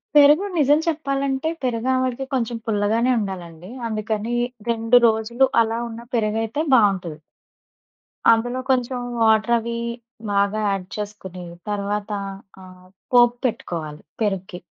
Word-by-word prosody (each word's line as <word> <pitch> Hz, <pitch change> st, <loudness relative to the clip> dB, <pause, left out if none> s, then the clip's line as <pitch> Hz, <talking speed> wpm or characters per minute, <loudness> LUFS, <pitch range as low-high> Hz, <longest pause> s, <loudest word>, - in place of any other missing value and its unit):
పెరుగు 295 Hz, +6 st, +7 dB
నిజం 295 Hz, +1 st, +4 dB
చెప్పాలంటే 275 Hz, -2 st, -1 dB
పెరుగావడకి 255 Hz, +2 st, 0 dB
కొంచెం 235 Hz, -2 st, -1 dB
పుల్లగానే 220 Hz, +3 st, +1 dB
ఉండాలండి. 180 Hz, -3 st, -6 dB, 0.2 s
అందుకని 220 Hz, +1 st, -2 dB, 0.3 s
2 230 Hz, +1 st, +4 dB
రోజులు 225 Hz, +4 st, +2 dB, 0.2 s
అలా 225 Hz, +1 st, -2 dB
ఉన్న 230 Hz, +1 st, -8 dB
పెరుగైతే 225 Hz, +5 st, 0 dB
బావుంటది. 190 Hz, -8 st, +2 dB, 1.1 s
అందులో 245 Hz, +3 st, +1 dB
కొంచెం 250 Hz, -1 st, +1 dB, 0.2 s
వాటర్ 220 Hz, +1 st, +4 dB
అవి 235 Hz, +1 st, -4 dB, 0.6 s
బాగా 200 Hz, +1 st, +1 dB
యాడ్ 195 Hz, -2 st, -1 dB
చేసుకొని. 190 Hz, -3 st, -7 dB, 0.3 s
తర్వాత 205 Hz, +1 st, -2 dB, 0.5 s
ఆ -, -, -11 dB, 0.5 s
పోపు 240 Hz, 0 st, +6 dB
పెట్టుకోవాలి 155 Hz, -8 st, -5 dB, 0.2 s
పెరుగుకి. 190 Hz, -3 st, -3 dB
225 Hz, 105 wpm, -22 LUFS, 205-250 Hz, 1.1 s, పెరుగు